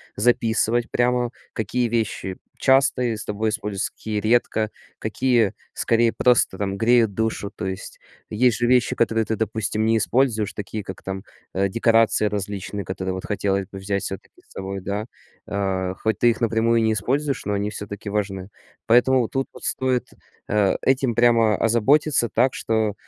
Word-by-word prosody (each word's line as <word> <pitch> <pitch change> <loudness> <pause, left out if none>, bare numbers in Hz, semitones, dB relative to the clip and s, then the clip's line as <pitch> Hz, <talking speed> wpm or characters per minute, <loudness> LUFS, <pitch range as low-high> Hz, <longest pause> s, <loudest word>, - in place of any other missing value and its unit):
записывать 115 +1 +1
прямо, 125 0 +1 0.2
какие 120 +3 -1
вещи 110 -4 -2 0.2
часто 130 -3 +3
тобой 110 +1 -1
используются, 105 -2 -2
какие 110 -1 -4
редко, 110 -1 +1 0.3
какие, 115 -1 +1 0.2
скорее, 115 0 +2
просто, 120 -6 +3
там, 100 -1 -2
греют 115 -1 +3
душу. 110 -1 -2
То - - -5
есть 95 +1 -6 0.3
есть 120 +2 +2
же 120 - 0
вещи, 125 -2 +3
которые 115 -1 +1
ты, 110 - -1
допустим, 110 -1 -1
не 115 0 +3
используешь, 110 -2 +1
такие 105 +1 -5
как, 95 - -8
там, 95 0 -5 0.3
э, 100 +1 +1
декорации 115 +1 +3
различные, 100 0 -4
которые 95 0 -3
вот 95 - -6
хотелось 100 -2 -1
бы 95 - -8
взять 100 0 -2
всё-таки 95 - -6
с - - -30
собой, 95 0 -5
да? 100 +3 -3 0.4
А, 95 -3 -1
хоть 110 -3 -2
ты 120 - +5
их 115 - -1
напрямую 115 0 +2
не 110 0 +2
используешь, 140 +6 -1
но 105 - -1
они 100 +1 -1
всё-таки 100 +1 -7
важны. 95 -2 -2 0.4
Поэтому 125 +1 +4
тут 135 0 -2
вот - - -13
стоит, 130 -1 0 0.4
э, 105 -2 +2
этим 130 -2 +2
прямо 115 -3 +4
озаботиться 120 +3 +3
так, 125 +3 +2
что 110 -2 0
110 Hz, 160 wpm, -23 LUFS, 100-120 Hz, 0.4 s, ты